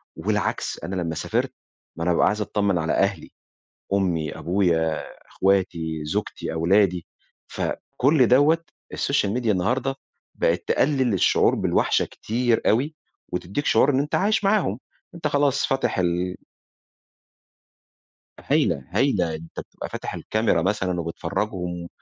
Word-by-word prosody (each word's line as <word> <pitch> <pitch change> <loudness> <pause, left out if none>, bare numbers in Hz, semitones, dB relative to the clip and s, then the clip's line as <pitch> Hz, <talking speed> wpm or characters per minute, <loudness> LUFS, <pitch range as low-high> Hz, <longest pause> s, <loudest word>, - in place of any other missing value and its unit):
والعكس. - - -1
أنا 90 +3 -4
لمّا 85 -3 -2
سافرت، - - -1 0.4
ما 85 - -4
أنا 90 - +2
بابقى - - +3
عايز 105 0 0
أتطمن 100 -2 0
على 80 -1 0
أهلي، 95 -4 0 0.6
أمي، 85 -6 0
أبويا، 85 -2 +1 0.2
أخواتي، 85 -5 0
زوجتي، 75 - -3
أولادي، 90 +1 +2 0.4
فكل 135 -1 +1
دوّة 150 +7 +4 0.3
السوشيال 105 -8 0
ميديا 120 -2 +1
النهارده 125 +8 0 0.4
بقت - - +1
تقلل 130 -5 +2
الشعور 95 - +3
بالوحشة - - +1
كتير 120 +1 0
أوي، 140 +8 +1 0.3
وتديك 95 +10 -3
شعور 135 - +4
إن 130 - +2
أنت 145 +1 -1
عايش 210 +2 +2
معاهم. 195 - +2 0.4
أنت 165 -3 -2
خلاص 145 -2 +2
فاتح 135 -6 0
ال 90 +1 0 2.0
هايلة، 70 - +1
هايلة. 95 - +1
أنت 80 +1 -9
بتبقى - - -8
فاتح - - -5
الكاميرا 110 -6 0
مثلًا 95 -1 0
وبتفرجهم 90 +1 -3
100 Hz, 125 wpm, -24 LUFS, 85-130 Hz, 2.0 s, دوّة